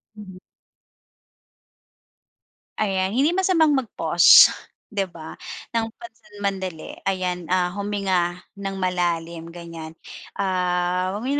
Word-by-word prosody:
Mhm. 195 Hz, -3 st, -11 dB, 2.4 s
Ayan, 190 Hz, -3 st, 0 dB
hindi 275 Hz, -, +2 dB
masamang 360 Hz, -5 st, +3 dB
mag-pause, 265 Hz, -5 st, +6 dB, 0.4 s
di 200 Hz, -, 0 dB
ba, 160 Hz, -2 st, -10 dB, 0.4 s
ng 225 Hz, -1 st, 0 dB
pansamandali. 205 Hz, -7 st, -6 dB
Ayan, 180 Hz, -2 st, -3 dB
ah, 180 Hz, -1 st, +1 dB
huminga 195 Hz, -3 st, -1 dB, 0.2 s
ng 195 Hz, -1 st, -5 dB
malalim, 170 Hz, -2 st, -2 dB
ganiyan. 165 Hz, -2 st, -9 dB, 0.4 s
Ah, 180 Hz, -1 st, 0 dB
huwag 205 Hz, +5 st, -5 dB
mo 275 Hz, -, 0 dB
190 Hz, 95 wpm, -23 LUFS, 175-210 Hz, 2.4 s, mag-pause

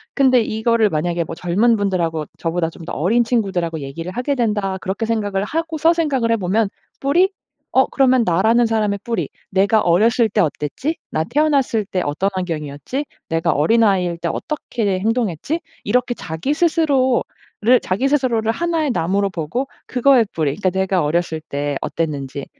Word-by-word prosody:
근데 260 Hz, -3 st, +4 dB
이거를 220 Hz, 0 st, +1 dB
만약에 170 Hz, +2 st, -1 dB
뭐 165 Hz, -, -7 dB
젊은 205 Hz, +8 st, +2 dB
분들하고 170 Hz, -6 st, -1 dB
저보다 165 Hz, 0 st, -1 dB
좀 165 Hz, -, -12 dB
더 -, -, -6 dB
어린 220 Hz, +10 st, +2 dB
친구들하고 190 Hz, -9 st, -1 dB
얘기를 165 Hz, +6 st, -6 dB
하게 250 Hz, +7 st, -1 dB
된다. 205 Hz, -5 st, 0 dB
그렇게 195 Hz, +4 st, -2 dB
생각을 205 Hz, -3 st, -1 dB
하고서 325 Hz, +3 st, +1 dB
생각을 275 Hz, -9 st, 0 dB
해보면 210 Hz, 0 st, +1 dB, 0.3 s
'뿌리? 350 Hz, +8 st, +3 dB, 0.4 s
어 265 Hz, -, +5 dB
그러면 260 Hz, -3 st, +3 dB
나라는 220 Hz, +7 st, +3 dB
사람의 210 Hz, -3 st, 0 dB
뿌리. 235 Hz, -1 st, -2 dB, 0.2 s
내가 200 Hz, +3 st, +3 dB
어렸을 220 Hz, +7 st, +3 dB
때 210 Hz, -, -1 dB
어땠지? 160 Hz, -, -2 dB, 0.2 s
나 155 Hz, -, 0 dB
태어났을 275 Hz, -, +1 dB
때 185 Hz, -1 st, -2 dB
어떤 155 Hz, +7 st, 0 dB
환경이었지? 165 Hz, -, -4 dB, 0.2 s
내가 165 Hz, 0 st, +1 dB
어린아이일 185 Hz, 0 st, +2 dB
때 170 Hz, -, -2 dB
어떻게 225 Hz, -10 st, -2 dB
행동했지?' 225 Hz, -, -1 dB, 0.2 s
이렇게 250 Hz, 0 st, +1 dB
자기 160 Hz, -, -3 dB
스스로를 265 Hz, -6 st, +1 dB
자기 205 Hz, +9 st, 0 dB
스스로를 240 Hz, -6 st, +1 dB
하나의 330 Hz, -2 st, 0 dB
나무로 195 Hz, +2 st, 0 dB
보고 185 Hz, -, -3 dB, 0.2 s
그거의 250 Hz, -1 st, +4 dB
뿌리 150 Hz, -3 st, 0 dB
그러니까 190 Hz, -2 st, 0 dB
내가 190 Hz, 0 st, 0 dB
어렸을 160 Hz, +1 st, -1 dB
때 145 Hz, -1 st, -3 dB
어땠는지 140 Hz, -4 st, -3 dB
210 Hz, 375 characters per minute, -19 LUFS, 170-250 Hz, 0.4 s, 어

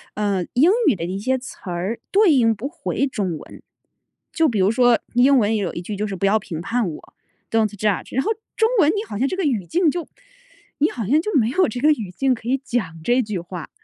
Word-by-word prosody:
呃， 200 Hz, -4 st, 0 dB
英 290 Hz, +9 st, +5 dB, 0.2 s
语 280 Hz, -, +4 dB
的 170 Hz, -, -6 dB
一 185 Hz, +2 st, -3 dB
些 260 Hz, +6 st, 0 dB
词 250 Hz, 0 st, -10 dB
儿 180 Hz, +5 st, -3 dB
对 400 Hz, -2 st, +5 dB
应 235 Hz, -6 st, +4 dB
不 225 Hz, +6 st, -5 dB
回 295 Hz, -3 st, -2 dB
中 190 Hz, -, -3 dB
文。 -, -, -13 dB, 0.7 s
就 325 Hz, -1 st, +3 dB
比 225 Hz, -7 st, -1 dB
如 190 Hz, +2 st, +3 dB
说 245 Hz, 0 st, +4 dB, 0.2 s
英 260 Hz, +3 st, +5 dB
文 215 Hz, -3 st, +2 dB
里 220 Hz, -, +1 dB
有 195 Hz, -5 st, -2 dB
一 170 Hz, -, -5 dB
句 205 Hz, +4 st, -5 dB
就 210 Hz, +2 st, -2 dB
是 195 Hz, -, -4 dB
不 190 Hz, -, -1 dB
要 200 Hz, +2 st, +4 dB
评 165 Hz, -5 st, -6 dB
判 225 Hz, +2 st, -1 dB
我， 155 Hz, -, -11 dB, 0.4 s
“don't 225 Hz, -1 st, +2 dB
judge"， 210 Hz, -2 st, -1 dB
然 265 Hz, -, +2 dB
后 440 Hz, -, 0 dB, 0.2 s
中 445 Hz, 0 st, +3 dB
文 305 Hz, -5 st, +5 dB
你 410 Hz, +2 st, -2 dB
好 205 Hz, -, -5 dB
像 260 Hz, +5 st, +1 dB
这 370 Hz, -, -2 dB
个 385 Hz, -, -2 dB
语 235 Hz, -, 0 dB
境 340 Hz, -, +2 dB
就 345 Hz, 0 st, -5 dB, 0.7 s
你 300 Hz, -, +3 dB
好 230 Hz, -4 st, -5 dB
像 295 Hz, +7 st, +3 dB
就 425 Hz, +5 st, -4 dB
没 230 Hz, -5 st, +3 dB
有 370 Hz, +9 st, +2 dB
这 240 Hz, +3 st, -5 dB
个 300 Hz, -, +4 dB
语 220 Hz, -11 st, -2 dB
境 265 Hz, +8 st, +1 dB
可 230 Hz, -1 st, -8 dB
以 260 Hz, +2 st, +2 dB
讲 185 Hz, -11 st, -3 dB
这 245 Hz, +7 st, +3 dB
句 210 Hz, -5 st, -3 dB
话。 175 Hz, 0 st, -8 dB
230 Hz, 295 characters per minute, -21 LUFS, 195-275 Hz, 0.7 s, 英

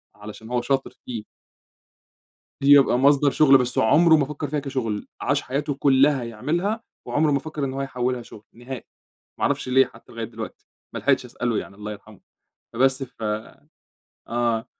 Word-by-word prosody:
علشان 105 Hz, +2 st, -10 dB
هو 125 Hz, 0 st, 0 dB
شاطر 135 Hz, +2 st, -1 dB
فيه. 115 Hz, -4 st, -5 dB, 1.4 s
يبقى 140 Hz, -3 st, +6 dB
مصدر 140 Hz, 0 st, +4 dB
شغل، 140 Hz, -3 st, +6 dB
بس 125 Hz, -1 st, -2 dB
هو -, -, +4 dB
عمره 160 Hz, +8 st, +6 dB
ما 145 Hz, -, +2 dB
فكر 150 Hz, +1 st, -5 dB
فيها 150 Hz, +1 st, -1 dB
كشغل، 125 Hz, -7 st, -3 dB
عاش -, -, +1 dB
حياته 140 Hz, +2 st, -2 dB
كلها 135 Hz, -1 st, +3 dB
يعملها 170 Hz, -, -2 dB, 0.2 s
وعمره 150 Hz, 0 st, +2 dB
ما 140 Hz, -, +2 dB
فكر 150 Hz, -1 st, -4 dB
إن 130 Hz, -, -4 dB
هو 135 Hz, -, -3 dB
يحوّلها 125 Hz, -2 st, -2 dB
شغل، 110 Hz, -2 st, -13 dB
نهائي، 120 Hz, +1 st, -8 dB, 0.6 s
ما -, -, -2 dB
اعرفش -, -, -1 dB
ليه 135 Hz, +1 st, +5 dB
حتى -, -, -17 dB
لغاية -, -, -4 dB
دلوقتي، -, -, -9 dB, 0.3 s
ما -, -, -3 dB
لحقتش 135 Hz, -2 st, +2 dB
أسأله 120 Hz, -2 st, -2 dB
يعني، 100 Hz, -, -6 dB
الله 105 Hz, +1 st, -7 dB
يرحمه، 105 Hz, 0 st, -12 dB, 0.6 s
فبس 130 Hz, +2 st, +2 dB
ف 125 Hz, -3 st, -9 dB, 1.1 s
آه. 115 Hz, -1 st, 0 dB
130 Hz, 165 wpm, -23 LUFS, 120-140 Hz, 1.4 s, يبقى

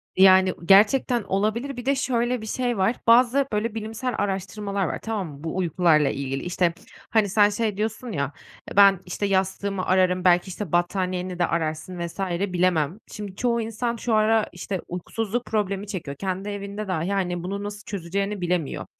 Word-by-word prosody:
Yani, 190 Hz, -1 st, +6 dB
gerçekten 220 Hz, +5 st, +5 dB
olabilir. 220 Hz, +8 st, -1 dB
Bir 245 Hz, -, -6 dB
de 275 Hz, +1 st, +2 dB
şöyle 245 Hz, -2 st, 0 dB
bir -, -, -7 dB
şey 245 Hz, 0 st, -1 dB
var. 195 Hz, +6 st, +2 dB
Bazı, 250 Hz, +4 st, +5 dB
böyle, 215 Hz, +1 st, -1 dB
bilimsel 225 Hz, +3 st, -3 dB
araştırmalar 200 Hz, 0 st, -2 dB
var, -, -, -3 dB
tamam 215 Hz, -5 st, -3 dB
mı? 145 Hz, -1 st, -11 dB
Bu 165 Hz, -, -4 dB
uykularla 165 Hz, -4 st, +3 dB
ilgili. 135 Hz, 0 st, -3 dB
İşte, 175 Hz, -1 st, +1 dB, 0.4 s
hani, 215 Hz, -3 st, +2 dB
sen 205 Hz, +1 st, +5 dB
şey 210 Hz, -1 st, -2 dB
diyorsun 220 Hz, +3 st, -3 dB
ya, 140 Hz, -5 st, -2 dB, 0.4 s
eee, -, -, -7 dB
"Ben 200 Hz, -2 st, +7 dB
işte 180 Hz, +3 st, -3 dB
yastığımı 195 Hz, 0 st, 0 dB
ararım, 185 Hz, -1 st, +2 dB
belki, 175 Hz, +1 st, +4 dB
işte, 190 Hz, -2 st, -6 dB
battaniyeni 180 Hz, 0 st, -1 dB
de 175 Hz, -, +4 dB
ararsın 160 Hz, +2 st, -3 dB
vs." 170 Hz, +2 st, -6 dB, 0.3 s
bilemem. 175 Hz, -1 st, +1 dB
Şimdi 205 Hz, -3 st, -7 dB
çoğu 235 Hz, +1 st, 0 dB
insan 230 Hz, +2 st, -2 dB
şu 235 Hz, 0 st, -2 dB
ara, 215 Hz, 0 st, +3 dB
işte, 190 Hz, -4 st, -5 dB
uykusuzluk 225 Hz, +6 st, -3 dB
problemi 205 Hz, -2 st, -1 dB
çekiyor, 160 Hz, -8 st, -5 dB
kendi 190 Hz, +2 st, -3 dB
evinde 205 Hz, +1 st, -5 dB
dahi, 175 Hz, -1 st, -1 dB
hani, 180 Hz, -3 st, -1 dB
bunu 200 Hz, +3 st, -4 dB
nasıl 205 Hz, 0 st, -6 dB
çözeceğini 200 Hz, 0 st, -3 dB
bilemiyor. 175 Hz, -4 st, -1 dB
195 Hz, 170 wpm, -24 LUFS, 180-220 Hz, 0.4 s, Ben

